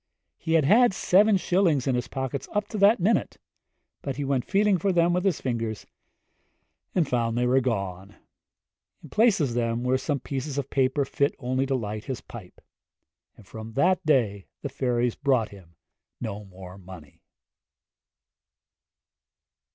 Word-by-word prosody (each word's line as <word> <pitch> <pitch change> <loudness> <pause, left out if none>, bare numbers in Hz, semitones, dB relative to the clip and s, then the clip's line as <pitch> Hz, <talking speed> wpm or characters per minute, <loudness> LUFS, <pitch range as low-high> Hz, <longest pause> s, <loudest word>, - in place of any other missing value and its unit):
He 160 - -2
had 160 -3 +4
had 225 - +5
seven 200 +3 +4
shillings 175 -7 +1
in 135 - +1
his 125 0 -1
pockets 130 0 -4
up 210 -1 -1
to 215 - -5
that 205 +3 +5
minute, 200 +6 +1 0.7
and 135 -2 -4
he 145 - -2
went 135 -2 0
feeling 200 -1 +3
for 195 +4 +1
them 175 -1 +3
with 180 +1 0
his 195 -6 +1
fingers, 115 -4 -3 1.1
and 170 -6 +2
found 115 -2 0
they 125 - +1
were 130 +2 +3
gone. 100 -5 -3 0.9
In - - -12
place 220 -3 +4
of 140 -6 0
them 115 0 -1
were 130 +1 +1
some 140 +1 -2
pieces 135 +2 -5
of 140 -1 -3
paper 135 +1 +1
fit 140 +2 0
only 130 +1 -1
to 135 - 0
light 110 -3 -4
his 130 -3 -4
pipe. 105 -7 -12 0.8
And - - -16
from 110 0 -9
that 180 +8 +2
day 115 - +1 0.2
the 140 - -3
fairies 125 -3 0
brought 130 -6 +1
him 90 -4 -16 0.4
no 105 -3 -5
more 95 0 -12
money. 90 -6 -13
130 Hz, 160 wpm, -26 LUFS, 115-165 Hz, 1.1 s, had